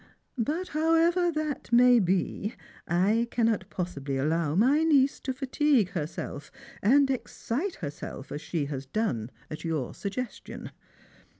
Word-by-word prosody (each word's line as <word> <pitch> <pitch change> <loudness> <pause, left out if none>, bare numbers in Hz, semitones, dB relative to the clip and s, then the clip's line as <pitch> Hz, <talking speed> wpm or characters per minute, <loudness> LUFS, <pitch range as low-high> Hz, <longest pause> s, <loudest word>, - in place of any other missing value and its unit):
But, 315 +11 -1
however 330 +3 +3
that 305 -5 -3
may 245 0 +7
be, 195 +2 0 0.3
I 205 +7 +2
cannot 225 -5 +1
pos 180 -1 -3
sibly 140 -1 -3
allow 155 +2 0
my 260 - +4
niece 280 -4 +4
to 265 - -3
fatigue 265 - +2
herself 155 -4 -5 0.3
and 275 +7 +5
excite 270 +6 -3
herself 145 -3 -7
as 145 - -4
she 160 -4 -2
has 140 -2 -5
done 130 - -1 0.2
at 155 - -6
your 160 -7 -2
suggestion. 235 +5 -6
220 Hz, 130 wpm, -28 LUFS, -, 0.3 s, may